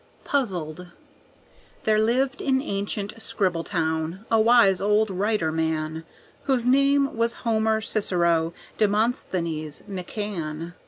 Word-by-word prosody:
Puzzled 180 - -2 1.0
There 215 -1 +3
lived 255 +5 +1
in 265 -1 +2
ancient 200 -3 -3
Scribbletown 170 -3 -1
a 225 -1 +5
wise 220 -5 +5
old 210 +1 +2
writer 190 -3 0
man, 160 0 -2 0.4
Whose 260 -4 +1
name 275 +2 +3
was 230 +1 -2
Homer 220 -1 +2
Cicero 170 -6 +1 0.3
Demosthenes 185 - -1
McCann. 175 -4 -5
205 Hz, 100 wpm, -25 LUFS, 165-225 Hz, 1.0 s, a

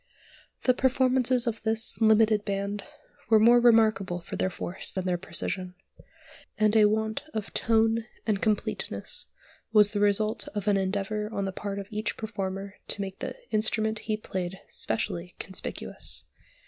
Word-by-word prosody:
The 255 - +5
performances 255 -1 +2
of 230 -2 -2
this 225 +1 +1
"limited 220 -1 +5
band" 200 0 -2 0.5
were 220 - +7
more 235 +3 +7
remarkable 215 -6 +4
for 170 - -7
their 185 - 0
force 180 0 -3
than 190 -1 -3
their 180 -1 0
precision; 185 0 -3 0.8
and 215 0 +3
a 215 -1 +7
want 220 +1 0
of 215 -2 -4
"tone" 225 0 +2 0.2
and 210 -3 0
completeness 215 -2 -2 0.4
was 210 -2 +6
the 205 - 0
result 210 +1 +1
of 205 0 -3
an 205 - +4
endeavour 200 +2 -1
on 200 -2 -2
the 195 - -2
part 200 +1 -5
of 200 - -4
each 215 +1 -2
performer 200 -2 -4
to 205 - +1
make 190 -1 -5
the - - -4 0.2
instrument 220 0 +1
he 215 - +1
played 185 -3 -4
specially 175 -5 -2
conspicuous. 190 +1 -5
210 Hz, 150 wpm, -28 LUFS, 195-220 Hz, 0.8 s, were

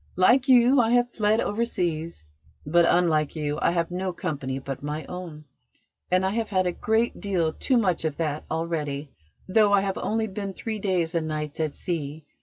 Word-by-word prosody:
Like 240 +9 +4
you, 255 +1 +6
I 225 - +1
have 245 0 +3
fled 215 0 +2
overseas, 175 - -2 0.4
but, 170 +3 +4
unlike 160 -4 +2
you, 150 -1 -2
I - - +3
have 170 0 -1
no 185 +1 -2
company 145 -8 -4
but 135 -1 -6
my 150 +2 -4
own, 170 -4 -8 0.6
and 185 +1 +2
I 190 - +1
have 225 0 -2
had 185 -3 +1
a 180 - +1
great 220 +6 0
deal 175 -6 0
too 260 - +1
much 185 -8 +1
of 155 -2 -2
that 155 -2 -2
already, 155 -3 -3 0.4
though 205 +1 +4
I 200 -1 +5
have 195 -1 -2
only 225 +1 0
been 200 -1 -5
three 220 +2 -5
days 185 -4 0
and 165 -2 -1
nights 150 -1 -4
at 155 -2 -1
sea. 155 -3 -4
175 Hz, 190 wpm, -25 LUFS, 155-205 Hz, 0.6 s, you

